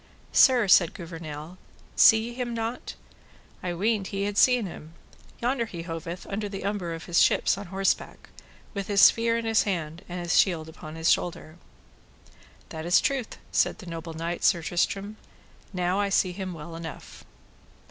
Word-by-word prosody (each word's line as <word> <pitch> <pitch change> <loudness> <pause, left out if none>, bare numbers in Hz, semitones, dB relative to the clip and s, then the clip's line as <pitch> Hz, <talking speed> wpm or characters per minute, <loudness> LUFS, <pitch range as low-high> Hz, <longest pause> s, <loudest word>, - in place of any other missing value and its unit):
Sir, 250 -5 +5
said 180 -2 +5
Gouvernail, 165 0 -8 0.4
see 225 +1 +6
ye - - -8
him 240 -1 -4
not? 230 +2 -4 0.7
I 180 -2 -3
weened 205 +1 0
ye 195 0 -2
had 205 0 -2
seen 250 0 +4
him; 165 -2 -10 0.4
yonder 240 -1 0
he 170 -5 -7
hoveth 170 +1 -6
under 205 +1 -4
the 195 -1 -6
umbre 190 -5 -2
of 165 - -9
his 170 -1 +3
ships - - +3
on 200 0 -8
horseback, 195 +2 -2 0.4
with 200 -3 -4
his 200 -2 +3
spear 230 0 +5
in 230 - -3
his 225 -1 +3
hand 170 -4 -3
and 180 +1 -5
his 175 -1 +2
shield 165 -5 +1
upon 155 -1 -10
his 160 0 +2
shoulder. 165 -2 -2 1.1
That 160 0 -6
is 175 - +5
truth, 265 -5 -2
said - - +1
the 195 - -11
noble 165 -1 -7
knight, 170 +2 -4
Sir 170 -2 +3
Tristram, 195 +5 -1 0.5
now 180 0 0
I 200 -1 +1
see 185 -1 +2
him 185 -1 -6
well 165 +1 -9
enough. 165 -1 -9
185 Hz, 170 wpm, -26 LUFS, 165-210 Hz, 1.1 s, see